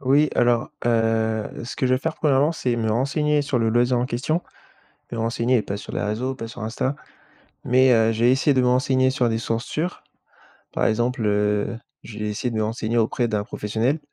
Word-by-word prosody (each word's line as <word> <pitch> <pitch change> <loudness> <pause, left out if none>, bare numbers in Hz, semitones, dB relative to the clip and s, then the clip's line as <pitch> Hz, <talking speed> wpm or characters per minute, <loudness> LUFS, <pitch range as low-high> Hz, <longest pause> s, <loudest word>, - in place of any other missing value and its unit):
Oui, 140 +3 +3
alors, 120 0 +2
heu, 115 -2 +1 0.2
ce 120 - -7
que 130 - 0
je 130 - +3
vais - - 0
faire, 160 +4 -3
1°, 145 0 +3
c'est 125 -6 -1
me 110 -1 0
renseigner 145 +5 +1
sur 140 -3 -1
le 115 -1 +1
loisir 120 +2 +2
en 120 - 0
question, 140 +8 -1 0.7
me 120 - -4
renseigner 115 +1 +1
pas 100 - -4
sur - - -9
les - - -2
réseaux, 120 +6 -2
pas 115 -3 -6
sur 115 - -9
Insta, 115 +5 -2 0.7
mais, 130 +1 +4
heu, 115 -1 +4
je 115 +1 -1
vais 125 - +6
essayer 135 +2 +2
de 130 - +3
me 125 - +2
renseigner 130 +1 +3
sur 130 -2 +1
des 110 -1 0
sources 115 +1 -2
sûres. 170 +4 -3 0.7
Par - - +1
exemple, 120 +2 0
heu, 105 +1 +1 0.3
je 110 - -9
vais 105 - -2
essayer 105 +4 -2
de 115 - -4
me 110 - +1
renseigner 115 +1 -1
auprès 115 +2 +1
d'un 105 -3 -1
professionnel 110 +6 -1
120 Hz, 210 wpm, -23 LUFS, 110-130 Hz, 0.7 s, vais